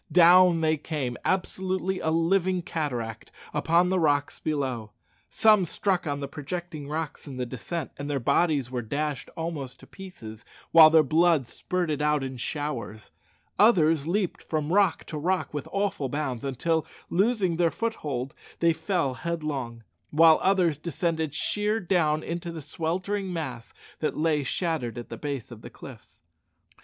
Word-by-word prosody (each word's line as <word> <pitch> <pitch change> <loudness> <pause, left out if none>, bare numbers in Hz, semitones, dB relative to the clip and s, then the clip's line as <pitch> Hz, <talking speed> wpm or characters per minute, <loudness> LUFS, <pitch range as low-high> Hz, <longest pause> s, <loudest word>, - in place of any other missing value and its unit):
Down 175 -1 +6
they 155 0 +2
came, 140 -5 -3
absolutely 185 0 -1
a 160 - -1
living 180 +2 +1
cataract, 125 -10 -4 0.2
upon 170 +4 +3
the 185 0 +2
rocks 145 -3 +1
below. 130 -8 -3 0.4
Some 215 -3 +5
struck 180 +1 -1
on 145 -1 -2
the 140 - -3
projecting 155 +1 -6
rocks 155 0 -4
in 135 -2 -7
the 125 - -2
descent, 135 +6 -5
and 145 +1 -5
their 140 -1 0
bodies 140 0 +1
were 125 -1 -2
dashed 145 +5 -3
almost 145 -6 -5
in - - -15
pieces, 115 - -10 0.3
while 160 -1 +9
their 160 0 +6
blood 160 -1 +3
spurted 170 -3 -2
out 150 -1 +2
in 130 -1 -5
showers. 120 -5 -4 0.5
Others 165 -8 +4
leaped 185 +1 -1
from 155 +1 -2
rock 195 -4 +3
to 155 - -6
rock 180 +3 -1
with 145 -2 -4
awful 195 -9 -1
bounds, 135 -4 -3
until, 160 +4 0 0.3
losing 195 -3 +2
their 170 -1 +3
foothold, 145 - -3 0.3
they 170 -1 +4
fell 160 -4 -1
headlong; 135 -6 -4 0.3
while 160 +1 +6
others 180 -6 +2
descended 160 -2 -2
sheer 210 +6 0
down 165 -5 +1
into 170 0 -4
the 160 -3 -7
sweltering 185 +6 -2
mass 135 -9 -5 0.3
that 155 - -2
lay 155 -2 +1
shattered 140 - -2
at 120 - -7
the - - -5
base 140 -5 -5
of 115 -2 -10
the - - -9
cliffs. - - -13
160 Hz, 155 wpm, -27 LUFS, 140-175 Hz, 0.5 s, while